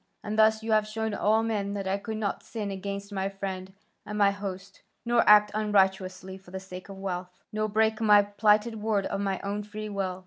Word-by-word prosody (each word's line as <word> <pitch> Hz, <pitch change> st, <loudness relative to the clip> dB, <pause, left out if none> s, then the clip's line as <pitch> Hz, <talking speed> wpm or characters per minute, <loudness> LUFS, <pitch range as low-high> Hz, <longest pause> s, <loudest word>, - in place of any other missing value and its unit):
And 210 Hz, +1 st, -3 dB
thus 220 Hz, 0 st, +4 dB
you 225 Hz, -, -2 dB
have 215 Hz, -1 st, +3 dB
shown 220 Hz, 0 st, -3 dB
all 220 Hz, +2 st, +2 dB
men 205 Hz, -3 st, -2 dB
that 195 Hz, -1 st, -3 dB
I 195 Hz, +1 st, 0 dB
could 220 Hz, +2 st, -5 dB
not 210 Hz, -2 st, -2 dB
sin 210 Hz, -3 st, -5 dB
against 200 Hz, +1 st, -5 dB
my 195 Hz, 0 st, -1 dB
friend 190 Hz, -1 st, -5 dB, 0.3 s
and 210 Hz, 0 st, -6 dB
my 200 Hz, -1 st, +5 dB
host, 195 Hz, -1 st, -7 dB, 0.2 s
nor 235 Hz, 0 st, +4 dB
act 210 Hz, 0 st, +7 dB
unrighteously 190 Hz, -3 st, 0 dB
for 190 Hz, -, -18 dB
the 190 Hz, +1 st, -5 dB
sake 185 Hz, 0 st, -10 dB
of 195 Hz, -, -8 dB
wealth, 180 Hz, -2 st, -4 dB, 0.2 s
nor 215 Hz, 0 st, -1 dB
break 220 Hz, +1 st, +1 dB
my 210 Hz, -2 st, +6 dB
plighted 210 Hz, +2 st, +2 dB
word 210 Hz, -2 st, 0 dB
of 195 Hz, -, -2 dB
my 195 Hz, -2 st, -1 dB
own 200 Hz, +1 st, -3 dB
free 210 Hz, +1 st, -7 dB
will. 190 Hz, -2 st, -3 dB
205 Hz, 210 wpm, -28 LUFS, 195-215 Hz, 0.3 s, act